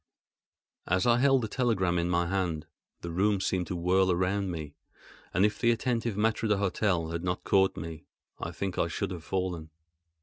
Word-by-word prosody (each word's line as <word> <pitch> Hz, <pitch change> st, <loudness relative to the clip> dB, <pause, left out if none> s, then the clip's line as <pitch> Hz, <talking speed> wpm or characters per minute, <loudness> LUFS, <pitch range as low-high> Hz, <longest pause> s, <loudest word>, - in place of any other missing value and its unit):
As 95 Hz, +2 st, +2 dB
I 120 Hz, 0 st, +4 dB
held 135 Hz, -1 st, +4 dB
the -, -, -1 dB
telegram 105 Hz, -8 st, +1 dB
in 85 Hz, +1 st, 0 dB
my 85 Hz, 0 st, +2 dB
hand, 85 Hz, -4 st, -1 dB, 0.4 s
the 85 Hz, -, -5 dB
room 100 Hz, +3 st, +2 dB
seemed 95 Hz, -2 st, -1 dB
to 90 Hz, -, -3 dB
whirl 90 Hz, +2 st, +3 dB
around 95 Hz, +2 st, 0 dB
me; 80 Hz, -4 st, -5 dB, 0.6 s
and, 95 Hz, +4 st, +3 dB
if 105 Hz, -1 st, 0 dB
the 115 Hz, -, +3 dB
attentive 115 Hz, -2 st, 0 dB
maître 110 Hz, +1 st, +1 dB
d'hôtel 100 Hz, -4 st, +1 dB
had 85 Hz, +1 st, -3 dB
not 90 Hz, 0 st, -2 dB
caught 95 Hz, -1 st, +3 dB
me, 80 Hz, 0 st, -7 dB, 0.3 s
I -, -, -3 dB
think 90 Hz, +2 st, -4 dB
I 85 Hz, -, +2 dB
should 95 Hz, +3 st, -3 dB
have 85 Hz, -3 st, -6 dB
fallen. 90 Hz, -4 st, -3 dB
95 Hz, 180 wpm, -29 LUFS, 85-105 Hz, 0.6 s, I